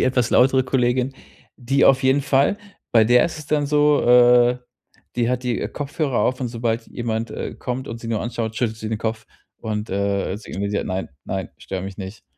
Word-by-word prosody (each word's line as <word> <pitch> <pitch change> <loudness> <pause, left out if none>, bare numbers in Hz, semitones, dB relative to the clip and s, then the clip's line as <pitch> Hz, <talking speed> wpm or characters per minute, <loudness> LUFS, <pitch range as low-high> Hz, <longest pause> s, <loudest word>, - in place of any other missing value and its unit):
die - - +3
etwas 125 -2 +1
lautere 130 0 +4
Kollegin, 125 0 +1 0.4
die 135 +2 +1
auf 135 0 +5
jeden 135 +2 +3
Fall. 140 +7 +2 0.4
Bei 115 -2 +6
der 120 +2 +5
ist 165 - -4
es 150 - -10
dann 150 -2 +1
so, 150 0 +3
äh, 125 0 +5 0.6
die 120 -1 +1
hat 125 0 -1
die 125 -2 -1
Kopfhörer 145 -2 -2
auf 130 +1 0
und 125 - -1
sobald 115 0 -2
jemand, 115 -2 -3
äh, - - -5
kommt 125 +1 -5
und 115 +1 -6
sie 115 - -7
nur 110 -2 -1
anschaut, 115 -2 -4
schüttet 115 -3 -1
sie 110 0 -6
den 110 -1 -2
Kopf 110 0 -3 0.3
und, 105 -1 -4
äh, 100 0 -1
signalisiert: 100 -1 -3
„Nein, 95 +1 -3 0.2
nein, 95 -2 -4
stör 95 -1 -5
mich 95 +1 -7
nicht.“ 95 +2 -8
120 Hz, 200 wpm, -22 LUFS, 110-130 Hz, 0.6 s, Bei